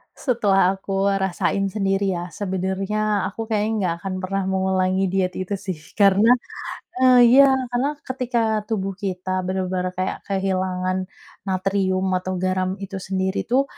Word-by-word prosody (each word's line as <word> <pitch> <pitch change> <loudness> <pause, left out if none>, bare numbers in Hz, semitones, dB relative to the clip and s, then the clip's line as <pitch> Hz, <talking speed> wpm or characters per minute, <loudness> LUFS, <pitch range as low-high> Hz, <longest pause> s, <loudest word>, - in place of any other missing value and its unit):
Setelah 195 -7 +2
aku 195 0 0
rasain 195 0 0
sendiri 195 -1 +1
ya, 175 0 -4
sebenarnya, 195 +2 -1
aku 225 +3 -5
kayaknya 215 0 0
enggak 185 -6 0
akan 190 +2 -5
pernah 195 +1 -2
mengulangi 190 0 +1
diet 185 -1 0
itu 185 +2 -3
sih, 190 -1 -4 0.2
karena, 200 +2 +5 0.7
eee, 255 -1 +6 0.2
iya. 275 - +9 0.2
Karena 270 +5 0
ketika 255 -2 -2 0.3
tubuh 195 -3 -1
kita 185 -1 -2
benar-benar 185 -1 -2
kayak 185 0 -3
kehilangan 185 -1 -1 0.4
natrium 190 0 0
atau 185 +1 -4
garam 185 0 -1
itu 195 0 -5
sendiri 190 0 -2
tuh, 260 +3 +3
190 Hz, 135 wpm, -22 LUFS, 185-200 Hz, 0.7 s, iya